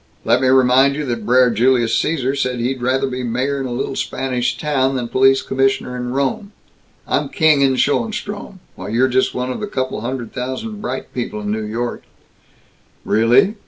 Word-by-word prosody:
"Let 120 +3 +3
me 130 - +2
remind 130 +1 +4
you 150 0 -3
that 120 -4 -4
Brer 125 0 +5
Julius 120 +1 +2
Cæsar 140 -4 0
said 130 -2 -1
he'd 125 +2 -2
rather 130 +2 +1
be 130 -1 -4
mayor 125 +4 -1
in 135 - -3
a - - -6
little 130 +2 -3
Spanish 125 -2 -2
town 135 -3 0
than 125 -2 -2
police 135 +2 +3
commissioner 135 -1 0
in 125 0 -4
Rome. 140 - -2 0.5
I'm - - 0
king 155 -5 +3
in 135 -1 +3
Schoenstrom, 205 - -2 0.2
while 95 +2 -7
you're 120 +4 +2
just 130 0 +1
one 125 0 -2
of - - -5
a 210 - -3
couple 130 - -3
hundred 120 0 -5
thousand 130 - -5
bright 215 - -5
people 120 -4 -4
in 105 0 -3
New 110 +1 -2
York 115 +3 -4 0.6
" - - -36
"Really? 125 - +3
130 Hz, 190 wpm, -19 LUFS, 120-135 Hz, 0.6 s, Brer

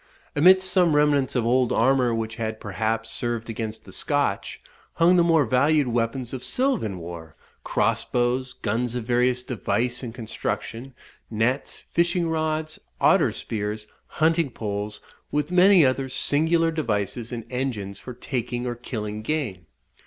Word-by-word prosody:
Amidst 185 +5 +6
some 180 -4 +3
remnants 145 -2 +2
of 120 -3 +1
old 125 +1 +2
armour, 125 +1 +3
which 115 0 -3
had, 110 -1 -3
perhaps, 110 +3 -2
served 120 -1 -3
against 110 -1 -5
the - - -13
Scotch, - - -1 0.3
hung 170 +2 +4
the 175 - +5
more 165 -4 +4
valued 145 +3 +3
weapons 120 +2 -1
of 130 - -5
silvan 250 - 0
war, 85 -2 -9 0.3
cross - - +1
bows, 125 +1 -1
guns 115 +3 -1
of 125 - -2
various 125 +1 +1
device 120 +1 -1
and 120 -3 -5
construction, 120 +2 -5 0.3
nets, 115 +5 -1
fishing 170 0 +1
rods, 155 0 -2 0.2
otter - - +4
spears, 105 -1 -4 0.2
hunting 160 -1 +1
poles, 105 -2 -5 0.3
with 150 +3 -1
many 180 -2 +6
other 130 +1 0
singular 165 +5 +2
devices, 115 - -2
and 115 -2 -5
engines 120 -7 -3
for 125 - -9
taking 125 -1 -3
or 120 - -2
killing 110 -3 -5
game. 110 - -3
125 Hz, 145 wpm, -24 LUFS, 110-150 Hz, 0.3 s, Amidst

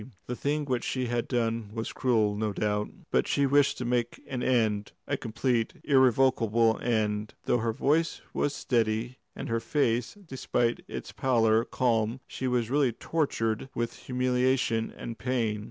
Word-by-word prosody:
The 125 - -4
thing 145 +3 -1
which 125 -3 -1
she 130 -1 -1
had 120 -1 -1
done 115 -3 -1
was 115 0 -3
cruel, 110 -5 +2
no 105 0 -1
doubt. 105 0 -1 0.2
But - - +2
she 140 - +2
wished 140 +1 +3
to 125 - -4
make 120 -1 -1
an 130 -2 -4
end 110 -5 +1
a - - -1
complete, 115 0 -1
irrevocable 125 -4 +3
end; 110 -2 0
though 120 - +2
her 115 +1 0
voice 150 +8 +1
was 145 - 0
steady 115 +1 0 0.2
and - - -5
her 115 0 0
face, 125 - 0
despite 125 -2 -1
its - - -6
pallor, 115 -4 +2
calm, 115 -2 0
she 130 - -4
was 120 -2 0
really 140 -3 +3
tortured 115 -6 -1
with 120 0 -2
humiliation 125 -2 +1
and 115 -1 -7
pain. 115 -4 0
120 Hz, 155 wpm, -28 LUFS, 115-130 Hz, 0.2 s, wished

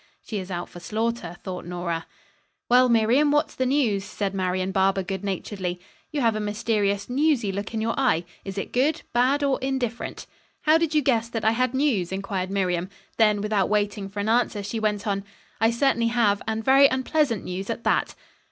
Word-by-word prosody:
"She 215 - -3
is 185 0 -7
out 175 -1 -4
for 175 - -11
slaughter," 220 -3 -3
thought 185 -2 -5
Nora. 175 -1 -4 0.6
"Well, 250 +1 +5
Miriam, 235 +6 +4
what's 295 +1 +1
the 260 - -1
news?" 245 -8 +1
said 195 0 -3
Marian 185 0 -1
Barber 195 0 +2
good 190 +1 -4
naturedly. 190 -2 -3 0.3
"You 295 - -1
have 230 -3 +2
a - - -1
mysterious, 205 -1 0
newsy 260 -5 +1
look 200 +2 -4
in 220 - -1
your 230 +1 0
eye. 175 -11 +2 0.2
Is 195 0 -7
it 195 - -4
good, 295 +6 +1
bad 260 +4 +3
or 275 -2 +1
indifferent?" 255 -3 -3 0.4
"How 315 +1 +4
did 330 -2 0
you 300 - +3
guess 230 -4 +1
that 225 -2 -3
I 220 - +5
had 255 +2 0
news?" 245 -11 +1
inquired 190 -1 -3
Miriam. 185 -2 -1 0.3
Then 210 -2 +4
without 210 -3 +1
waiting 205 -1 0
for 205 +1 -7
an 205 +2 -1
answer 230 -3 +1
she 205 +3 -3
went 210 -2 -1
on. 200 -2 -1 0.4
"I 225 +1 +4
certainly 235 -1 +2
have, 225 -4 +2
and 220 0 -2
very 275 +1 +7
unpleasant 260 -3 0
news, 190 +3 -5
at 230 0 -3
that." - - +1
215 Hz, 195 wpm, -25 LUFS, 195-250 Hz, 0.6 s, very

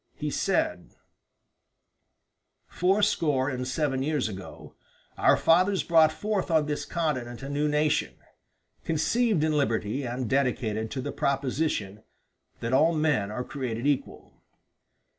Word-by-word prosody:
He - - -4
said: - - -1 1.7
"Fourscore 175 -8 +1
and 125 0 -4
seven 135 -1 -1
years 150 -2 0
ago 95 -3 -9 0.4
our - - +4
fathers 185 +4 +3
brought 160 -2 +5
forth 205 +3 -2
on 160 -2 +3
this 150 0 -3
continent 130 -7 -3
a 135 - -5
new 145 +1 0
nation, 150 0 +1 0.7
conceived 185 +3 +1
in 155 - +2
liberty 120 -2 0
and 125 0 -3
dedicated 115 -4 0
to 130 - -4
the - - -4
proposition 135 -7 -1 0.6
that 115 +2 -2
all 160 +5 +4
men 150 -10 +1
are 115 +4 -4
created 125 -3 -4
equal. 145 -2 -3
145 Hz, 125 wpm, -27 LUFS, 125-160 Hz, 1.7 s, brought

